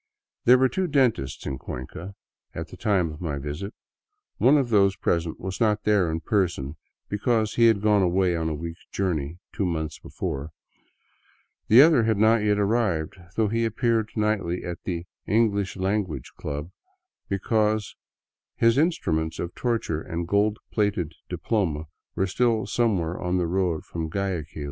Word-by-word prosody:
There 125 Hz, +2 st, +8 dB
were 130 Hz, +1 st, +4 dB
two 185 Hz, +6 st, -1 dB
dentists 130 Hz, -, +1 dB
in 65 Hz, -, -3 dB
Cuenca 85 Hz, +10 st, -7 dB, 0.4 s
at -, -, -5 dB
the -, -, -10 dB
time 95 Hz, -7 st, +1 dB
of 75 Hz, -, -10 dB
my 75 Hz, -5 st, -2 dB
visit. 75 Hz, +9 st, -5 dB, 0.6 s
One 140 Hz, +4 st, +5 dB
of 135 Hz, -4 st, +1 dB
those 100 Hz, -3 st, +4 dB
present 85 Hz, -2 st, -1 dB
was 95 Hz, +3 st, -5 dB
not 105 Hz, -2 st, +2 dB
there 100 Hz, -5 st, +3 dB
in 80 Hz, +1 st, -2 dB
person, 85 Hz, -6 st, 0 dB, 0.3 s
because 110 Hz, +1 st, 0 dB
he 115 Hz, -1 st, +5 dB
had 110 Hz, -3 st, +3 dB
gone 105 Hz, -2 st, +4 dB
away 90 Hz, 0 st, +2 dB
on 80 Hz, -1 st, -1 dB
a 80 Hz, -, -2 dB
week's 85 Hz, +3 st, -7 dB
journey 85 Hz, -5 st, -2 dB, 0.2 s
two -, -, -1 dB
months 80 Hz, -3 st, -3 dB
before; 70 Hz, +3 st, -5 dB, 1.2 s
the 120 Hz, +6 st, +9 dB
other 160 Hz, -6 st, +5 dB
had 110 Hz, -2 st, +1 dB
not 110 Hz, +2 st, +5 dB
yet 105 Hz, -1 st, +1 dB
arrived, 100 Hz, -6 st, +1 dB, 0.2 s
though 110 Hz, -1 st, +2 dB
he 115 Hz, +2 st, 0 dB
appeared 115 Hz, -1 st, +1 dB
nightly 105 Hz, -5 st, 0 dB
at 85 Hz, -1 st, -5 dB
the 85 Hz, -2 st, -3 dB
" -, -, -58 dB
English 100 Hz, -4 st, +1 dB
Language 95 Hz, -, -2 dB
Club," 75 Hz, +3 st, -5 dB, 0.6 s
because 105 Hz, +1 st, 0 dB, 0.6 s
his 115 Hz, +3 st, +4 dB
instruments 80 Hz, -, 0 dB
of 85 Hz, 0 st, -4 dB
torture 115 Hz, -10 st, -1 dB
and 85 Hz, +1 st, -4 dB
gold 105 Hz, +2 st, +2 dB
plated 100 Hz, -7 st, 0 dB, 0.2 s
diploma 90 Hz, -4 st, -1 dB, 0.3 s
were 95 Hz, -, +1 dB
still 115 Hz, +3 st, +1 dB
some 115 Hz, -4 st, +1 dB
where 85 Hz, +1 st, -3 dB
on 90 Hz, +1 st, 0 dB
the 90 Hz, -, +1 dB
road 90 Hz, -2 st, 0 dB
from 80 Hz, -1 st, -4 dB
Guayaquil. 90 Hz, -5 st, -3 dB
95 Hz, 165 wpm, -25 LUFS, 85-110 Hz, 1.2 s, the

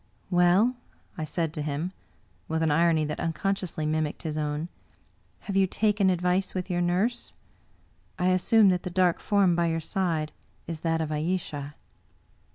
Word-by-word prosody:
" -, -, -34 dB
Well," 180 Hz, +8 st, +4 dB, 0.4 s
I 160 Hz, -4 st, -3 dB
said 160 Hz, +1 st, -2 dB
to 155 Hz, -, -4 dB
him, 150 Hz, +4 st, -2 dB, 0.6 s
with 160 Hz, 0 st, -1 dB
an 160 Hz, -, +2 dB
irony 160 Hz, 0 st, +3 dB
that 150 Hz, 0 st, -4 dB
unconsciously 170 Hz, -1 st, -2 dB
mimicked 155 Hz, -1 st, -1 dB
his 155 Hz, -2 st, -3 dB
own, 150 Hz, +1 st, -2 dB, 0.4 s
" -, -, -38 dB
have 200 Hz, -, -5 dB
you 195 Hz, -1 st, +4 dB
taken 205 Hz, 0 st, +2 dB
advice 180 Hz, +1 st, 0 dB
with 185 Hz, 0 st, -3 dB
your 175 Hz, 0 st, 0 dB
nurse? 190 Hz, +8 st, 0 dB, 0.8 s
I 180 Hz, +1 st, +2 dB
assume 195 Hz, +3 st, +5 dB
that 180 Hz, -1 st, +1 dB
the -, -, -5 dB
dark 180 Hz, -1 st, +2 dB
form 195 Hz, -4 st, +3 dB
by 170 Hz, 0 st, +2 dB
your 165 Hz, 0 st, 0 dB
side 165 Hz, -3 st, -1 dB, 0.3 s
is 165 Hz, -1 st, -5 dB
that 165 Hz, 0 st, 0 dB
of 155 Hz, -1 st, -3 dB
Ayesha!"! 150 Hz, -3 st, -3 dB
175 Hz, 165 wpm, -27 LUFS, 155-185 Hz, 0.8 s, assume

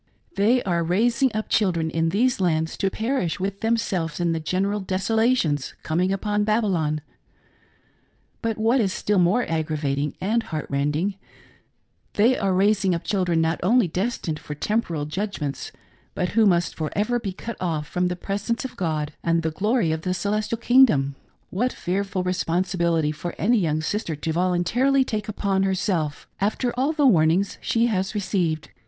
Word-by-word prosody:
They 230 Hz, +6 st, +3 dB
are 170 Hz, -3 st, 0 dB
raising 235 Hz, +9 st, +2 dB
up 215 Hz, -, -2 dB
children 170 Hz, -6 st, +1 dB
in 165 Hz, 0 st, +1 dB
these 235 Hz, +7 st, +1 dB
lands 160 Hz, -3 st, +1 dB
to 195 Hz, -, +1 dB
perish 220 Hz, -4 st, -1 dB
with 195 Hz, +1 st, -3 dB
themselves 195 Hz, -8 st, -1 dB
in 170 Hz, -1 st, +1 dB
the 165 Hz, -, -1 dB
general 195 Hz, +6 st, -1 dB
desolations 190 Hz, -, 0 dB
com 160 Hz, +2 st, -1 dB
ing 185 Hz, +1 st, +1 dB
upon 210 Hz, +1 st, 0 dB
Babylon. 190 Hz, -9 st, +1 dB, 1.4 s
But 225 Hz, -2 st, -1 dB
what 230 Hz, +4 st, +3 dB
is 195 Hz, -3 st, +1 dB
still 205 Hz, +1 st, 0 dB
more 185 Hz, +8 st, +3 dB
aggravating 150 Hz, -3 st, -1 dB
and 220 Hz, +5 st, +1 dB
heart 155 Hz, -8 st, -5 dB
rending, 150 Hz, +8 st, 0 dB, 1.0 s
they 230 Hz, +5 st, +4 dB
are 195 Hz, -5 st, 0 dB
raising 195 Hz, 0 st, +2 dB
up 170 Hz, -, -5 dB
children 180 Hz, -5 st, +1 dB
not 160 Hz, +1 st, 0 dB
only 230 Hz, +2 st, +3 dB
destined 180 Hz, -3 st, -2 dB
for 150 Hz, -, -7 dB
temporal 170 Hz, -4 st, -1 dB
judgments, 155 Hz, -4 st, -4 dB, 0.4 s
but 180 Hz, -, -1 dB
who 220 Hz, 0 st, +4 dB
must 175 Hz, -3 st, +2 dB
for 155 Hz, -2 st, -3 dB
ever 230 Hz, +4 st, +1 dB
be 200 Hz, -4 st, -4 dB
cut 225 Hz, +4 st, -7 dB
off 160 Hz, -4 st, -1 dB
from 180 Hz, +1 st, 0 dB
the 180 Hz, -, -2 dB
presence 205 Hz, +7 st, -3 dB
of 260 Hz, -, -6 dB
God 155 Hz, -4 st, -2 dB
and 165 Hz, 0 st, +1 dB
the 160 Hz, -, 0 dB
glory 210 Hz, +1 st, +1 dB
of 160 Hz, 0 st, -2 dB
the 185 Hz, +1 st, -1 dB
celestial 210 Hz, +5 st, -1 dB
king 250 Hz, +3 st, +6 dB
dom 140 Hz, -, 0 dB, 0.4 s
What 245 Hz, +7 st, 0 dB
fearful 190 Hz, +1 st, -2 dB
responsibility 170 Hz, -3 st, 0 dB
for 155 Hz, +3 st, -6 dB
any 235 Hz, +3 st, +3 dB
young 155 Hz, -4 st, 0 dB
sister 175 Hz, -1 st, -2 dB
to 160 Hz, +2 st, -3 dB
volun 175 Hz, +1 st, +1 dB
tarily 265 Hz, +6 st, +3 dB
take 215 Hz, -3 st, -3 dB
upon 195 Hz, -2 st, 0 dB
herself, 185 Hz, -5 st, -1 dB
after 220 Hz, +5 st, 0 dB
all 265 Hz, +5 st, +1 dB
the 305 Hz, -3 st, +1 dB
warnings 180 Hz, -3 st, +3 dB
she 230 Hz, 0 st, +1 dB
has 195 Hz, -3 st, -1 dB
received. 185 Hz, -6 st, -1 dB
190 Hz, 170 wpm, -24 LUFS, 165-215 Hz, 1.4 s, king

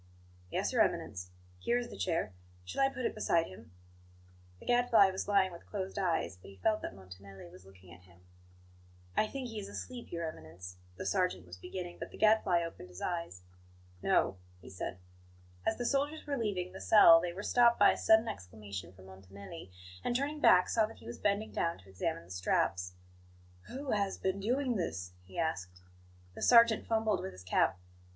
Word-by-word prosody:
"Yes, -, -, -1 dB
Your -, -, +4 dB
Eminence. 90 Hz, -3 st, -1 dB, 0.3 s
Here 240 Hz, -, +1 dB
is 240 Hz, -1 st, -3 dB
the -, -, -9 dB
chair; 165 Hz, -, -1 dB, 0.3 s
shall 90 Hz, -, -3 dB
I 270 Hz, -, +5 dB
put 255 Hz, -2 st, -5 dB
it -, -, 0 dB
beside 170 Hz, -6 st, +2 dB
him?" 95 Hz, -3 st, -13 dB, 0.9 s
The -, -, -14 dB
Gadfly 235 Hz, -5 st, +5 dB
was 190 Hz, -, -4 dB
lying 195 Hz, -2 st, +3 dB
with 170 Hz, -, -12 dB
closed 195 Hz, -1 st, -4 dB
eyes; 165 Hz, -, 0 dB
but -, -, -12 dB
he 100 Hz, -, -13 dB
felt 215 Hz, -, +1 dB
that -, -, -6 dB
Montanelli 95 Hz, 0 st, -12 dB
was 90 Hz, +1 st, -15 dB
looking 95 Hz, -2 st, -16 dB
at 85 Hz, -, -15 dB
him. 90 Hz, -1 st, -21 dB, 0.9 s
"I 215 Hz, -, +3 dB
think 265 Hz, +2 st, -5 dB
he 220 Hz, -2 st, -5 dB
is 200 Hz, -1 st, -7 dB
asleep, 245 Hz, +3 st, -7 dB
Your 170 Hz, -1 st, -3 dB
Eminence," 90 Hz, -, -9 dB, 0.2 s
the -, -, -5 dB
sergeant 180 Hz, -, 0 dB
was 90 Hz, 0 st, -11 dB
beginning, 175 Hz, -, -7 dB
but -, -, -6 dB
the -, -, -12 dB
Gadfly 215 Hz, -5 st, +4 dB
opened 165 Hz, -, -8 dB
his 90 Hz, +1 st, -11 dB
eyes. 170 Hz, -, -4 dB, 0.6 s
"No," 95 Hz, -, +2 dB, 0.2 s
he 90 Hz, -, -13 dB
said. 90 Hz, 0 st, -5 dB, 0.7 s
As 220 Hz, -, +1 dB
the 245 Hz, -, -3 dB
soldiers 285 Hz, +4 st, 0 dB
were 285 Hz, -, -1 dB
leaving 200 Hz, -7 st, -2 dB
the 190 Hz, -, -8 dB
cell 165 Hz, -6 st, +8 dB
they 175 Hz, 0 st, -2 dB
were 190 Hz, +4 st, -7 dB
stopped 235 Hz, 0 st, +4 dB
by -, -, +7 dB
a -, -, -1 dB
sudden 220 Hz, +1 st, +4 dB
exclamation 95 Hz, -, -7 dB
from 95 Hz, 0 st, -16 dB
Montanelli; 95 Hz, -, -11 dB, 0.3 s
and, 240 Hz, -, -1 dB
turning 285 Hz, +4 st, -1 dB
back, 180 Hz, -9 st, +6 dB
saw 220 Hz, -2 st, +2 dB
that 225 Hz, -, -13 dB
he -, -, -16 dB
was 120 Hz, -, -7 dB
bending 205 Hz, +1 st, 0 dB
down 170 Hz, 0 st, -1 dB
to 95 Hz, +1 st, -18 dB
examine 90 Hz, -3 st, -3 dB
the 85 Hz, -, -15 dB
straps. 90 Hz, 0 st, 0 dB, 0.7 s
"Who 270 Hz, +1 st, -5 dB
has 200 Hz, -2 st, 0 dB
been 190 Hz, +1 st, -1 dB
doing 245 Hz, +3 st, 0 dB
this?" 90 Hz, -, -4 dB
he 95 Hz, -, -12 dB
asked. 95 Hz, -, -3 dB, 0.5 s
The -, -, -10 dB
sergeant 230 Hz, -2 st, +6 dB
fumbled 220 Hz, -3 st, +1 dB
with 95 Hz, -, -6 dB
his 90 Hz, 0 st, -12 dB
cap. 90 Hz, 0 st, +2 dB
175 Hz, 195 wpm, -32 LUFS, -, 0.9 s, cell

